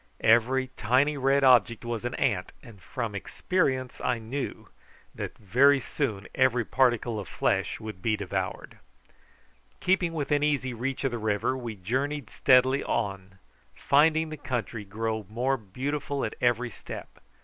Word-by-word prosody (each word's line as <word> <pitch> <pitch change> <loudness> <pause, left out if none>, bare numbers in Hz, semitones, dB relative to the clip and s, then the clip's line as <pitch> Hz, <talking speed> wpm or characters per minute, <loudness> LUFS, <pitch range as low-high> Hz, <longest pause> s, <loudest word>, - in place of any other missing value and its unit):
Each 130 +4 +3
tiny 130 +7 +2
red 135 0 +2
object 120 -3 +4
was 120 -1 -3
an 120 - -2
ant, - - 0
and 105 -5 -14
from 115 +2 -4
experience 130 - -1
I 125 -1 +1
knew 120 +5 -5 0.4
that - - -6
very 135 +8 +4
soon 115 -7 -3
every 125 -3 +2
particle 120 -3 +1
of 100 - -7
flesh - - 0
would 105 -4 -8
be 110 +1 +1
devoured. 100 -3 -4 1.0
Keeping 180 -2 +1
within 145 -2 0
easy 140 -4 0
reach 125 +4 -3
of 135 - +1
the 120 - -3
river 105 +3 0
we 120 -4 -5
journeyed 130 +7 -2
steadily 130 +2 +4
on, 95 -4 -3 0.4
finding 160 +2 +3
the 155 - -6
country 120 -5 -4
grow 110 0 -3
more 125 +5 0
beautiful 135 +6 -3
at 110 - -4
every 120 0 +1
step. - - -9
125 Hz, 145 wpm, -27 LUFS, 110-135 Hz, 1.0 s, object